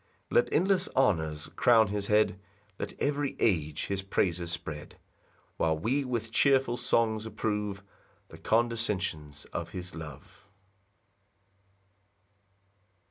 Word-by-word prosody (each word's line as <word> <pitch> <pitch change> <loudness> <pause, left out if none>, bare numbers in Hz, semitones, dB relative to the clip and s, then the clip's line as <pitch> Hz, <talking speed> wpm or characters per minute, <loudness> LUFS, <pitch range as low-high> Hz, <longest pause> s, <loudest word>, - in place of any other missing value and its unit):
6 - - -38
Let 485 0 +4
endless 190 0 +2
honours 80 - +1
crown 110 -4 +5
his 100 0 -2
head; 105 -2 +3 0.4
Let - - -5
every 145 -1 0
age 80 -8 +1
his 100 -1 -2
praises 90 -3 0
spread; 80 -4 -6 0.6
While 80 -1 +1
we 130 - 0
with 120 -3 -3
cheerful 135 -1 +3
songs 115 -2 +1
approve 105 -3 -2 0.5
The - - -12
condescensions 105 -10 0
of - - -4
his 90 0 -6
love. 80 +4 -10
105 Hz, 110 wpm, -29 LUFS, 85-120 Hz, 0.6 s, crown